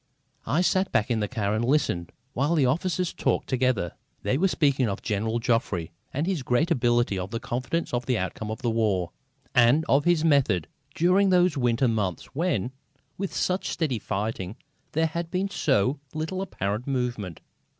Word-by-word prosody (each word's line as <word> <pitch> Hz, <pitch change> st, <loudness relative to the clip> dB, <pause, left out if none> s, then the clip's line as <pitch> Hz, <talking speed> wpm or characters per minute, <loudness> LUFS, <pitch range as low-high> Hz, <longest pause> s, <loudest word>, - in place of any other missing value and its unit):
I 140 Hz, +10 st, +2 dB
sat 185 Hz, +1 st, +2 dB
back 105 Hz, +2 st, +1 dB
in 115 Hz, -, +2 dB
the 105 Hz, -, 0 dB
car 105 Hz, -3 st, -1 dB
and 110 Hz, +2 st, 0 dB
listened 120 Hz, -, +1 dB, 0.2 s
while 145 Hz, +7 st, +1 dB
the 145 Hz, -5 st, +4 dB
officers 175 Hz, +6 st, 0 dB
talked -, -, 0 dB
together. 125 Hz, -, +1 dB, 0.3 s
They -, -, +1 dB
were 185 Hz, +8 st, +3 dB
speaking 140 Hz, -, +2 dB
of 100 Hz, -, -4 dB
General 110 Hz, +2 st, -1 dB
Joffre, 115 Hz, -, 0 dB, 0.2 s
of 145 Hz, +4 st, -1 dB
his 185 Hz, -5 st, -1 dB
great 130 Hz, +7 st, +1 dB
ability, 120 Hz, -, +2 dB
of 95 Hz, +2 st, -5 dB
his 115 Hz, -, -2 dB
confidence 130 Hz, +9 st, -2 dB
in 120 Hz, -, +2 dB
the 125 Hz, -3 st, +2 dB
outcome 100 Hz, +3 st, -3 dB
of 110 Hz, +4 st, -5 dB
the 120 Hz, -, +1 dB
war, 100 Hz, -6 st, +1 dB, 0.4 s
and 125 Hz, +5 st, +5 dB
of 140 Hz, +3 st, +3 dB
his 175 Hz, -2 st, +3 dB
method, 125 Hz, -, +3 dB, 0.3 s
during 185 Hz, +4 st, +4 dB
those 180 Hz, -3 st, +4 dB
winter 125 Hz, -1 st, +2 dB
months 105 Hz, -, -2 dB
when, 140 Hz, -, 0 dB, 0.5 s
with 195 Hz, -1 st, -2 dB
such 185 Hz, +1 st, -1 dB
steady 145 Hz, -9 st, -1 dB
fighting, 105 Hz, -1 st, -3 dB, 0.4 s
there 160 Hz, +2 st, +2 dB
had 165 Hz, +1 st, -3 dB
been 190 Hz, +3 st, -1 dB
so 135 Hz, -, +1 dB, 0.2 s
little 160 Hz, +5 st, -2 dB
apparent 105 Hz, -, -3 dB
movement. 120 Hz, -, -2 dB
125 Hz, 175 wpm, -26 LUFS, 110-160 Hz, 0.5 s, and